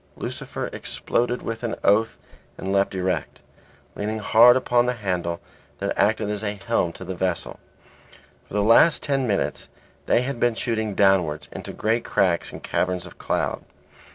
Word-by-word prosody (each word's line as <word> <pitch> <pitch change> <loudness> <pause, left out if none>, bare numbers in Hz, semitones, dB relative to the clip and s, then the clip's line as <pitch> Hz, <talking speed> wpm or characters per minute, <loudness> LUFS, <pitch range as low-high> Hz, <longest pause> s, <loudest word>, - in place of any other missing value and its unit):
Lucifer - - -5
exploded 120 +1 -1
with 115 0 -4
an 120 -2 -2
oath 110 +3 +3 0.4
and 95 +1 -3
leapt 100 0 +1
erect, 95 0 -2 0.5
leaning 105 +2 -2
hard 115 +3 +6
upon 120 -1 +2
the 125 - 0
handle 90 -5 -2 0.4
that - - -2
acted 105 0 +2
as 105 0 -3
a 105 -1 -2
helm 85 - +1
to 85 - -10
the 95 - -4
vessel. 90 -1 -3 0.9
For - - -9
the 105 - +2
last 115 +9 +5
ten 135 -3 0
minutes 100 -3 -1 0.4
they 120 - +3
had 135 -2 -4
been 120 -1 +2
shooting 110 -3 -2
downwards 95 -7 +2
into - - -7
great 115 +2 0
cracks 90 -3 +1
and - - -10
caverns 90 -1 -1
of 90 - -13
cloud. - - -1
105 Hz, 160 wpm, -24 LUFS, 95-115 Hz, 0.9 s, hard